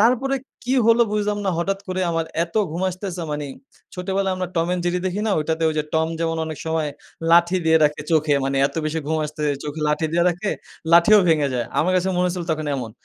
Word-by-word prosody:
তারপরে 255 +4 +3 0.3
কি 255 - 0
হলো 230 +1 +6
বুঝলাম 210 0 0
না - - +2
হঠাৎ 195 +3 -1
করে 185 0 -2
আমার 165 -1 0 0.2
এত 170 - -18 0.2
ঘুম 170 +3 -4
আসতেসে 185 -1 -5
মানে 150 0 -3 0.5
ছোটবেলায় 190 +1 -1
আমরা 185 -1 -3
Tom 165 - +2
and 180 - -2
Jerry 175 +1 +1
দেখি 190 +3 -2
না - - +1
ওইটাতে 160 +1 -1
ওই 160 - -1
যে 150 - 0
টম 160 0 +2
যেমন 165 0 0
অনেক 155 -2 -6
সময় 160 -1 0 0.4
লাঠি 175 +2 +5
দিয়ে 160 0 +5
রাখে 150 0 +1
চোখে। 155 -2 +3
মানি 135 0 -1
এত 145 - -10
বেশি 155 +1 -2
ঘুম 160 +1 0
আসতেছে 150 -1 -2
চোখে 150 +1 -5
লাঠি 155 +2 +1
দিয়া 170 0 +2
রাখে 180 +4 -2 0.4
লাঠিও 175 +5 +7
ভেঙে 150 -3 +3
যায়। 120 -2 -1
আমার 185 +3 +2
কাছে 185 +1 +1
মনে 180 - +2
হয়েছিল 180 -1 -3
তখন 155 -1 -3
এমন। 120 -4 -5
170 Hz, 220 wpm, -22 LUFS, 155-185 Hz, 0.5 s, লাঠিও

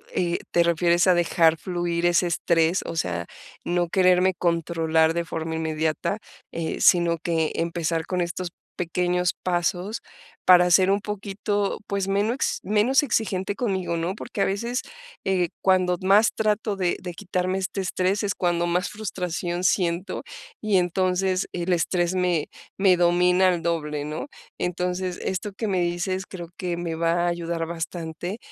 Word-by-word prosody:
eh, 175 -1 0
te 170 - +4
refieres 170 +1 +3
a 185 - +7
dejar 165 -1 +3
fluir 175 -1 -2
ese 175 +1 +3
estrés, 170 +1 +2
o - - -5
sea, 85 - -2 0.4
no 175 0 0
quererme 185 0 +4
controlar 165 -2 +1
de 170 0 -1
forma 160 0 -4
inmediata, 160 +3 -1 0.3
eh, 165 -1 -3
sino 170 -1 +5
que 160 -2 0
empezar 165 -1 -1
con 180 -1 -1
estos 175 +1 -3 0.3
pequeños 180 +1 0
pasos 180 +4 -1 0.4
para 180 -1 +7
ser 185 +2 +5
un 200 +1 +1
poquito, 205 0 -2
pues, 200 -1 -1
menos 205 +6 0
menos 215 +7 +3
exigente 200 -7 -1
conmigo, 190 -7 -1
¿no?, 170 +3 -1
porque 210 - -8
a - - +4
veces, 235 +6 -1 0.4
eh, 180 -3 +1
cuando 185 -1 +3
más 200 +4 +5
trato 215 -1 0
de 180 -2 +1
de 180 -1 -6
quitarme 185 0 -2
este 190 +1 -2
estrés, 185 +2 0
es 200 -1 0
cuando 175 -1 +1
más 180 +1 0
frustración 180 -4 -3
siento, 180 0 0 0.4
y 210 -3 +2
entonces, 185 +1 +1
el 180 +1 0
estrés 175 +1 +1
me 180 -4 +1 0.3
me 195 -2 +5
domina 180 +1 +4
al 175 -2 0
doble. 150 -3 -2
¿no?, 155 - -5 0.3
entonces, 180 +1 -2
esto 190 +2 -2
que 220 +3 -3
me 190 -3 +1
dices 175 +2 -1
creo 175 -3 -8
que 180 -2 -3
me 170 -1 -3
va 170 +1 +1
a - - +1
ayudar 170 -1 -2
bastante, 170 +3 -5
180 Hz, 155 wpm, -24 LUFS, 170-190 Hz, 0.4 s, a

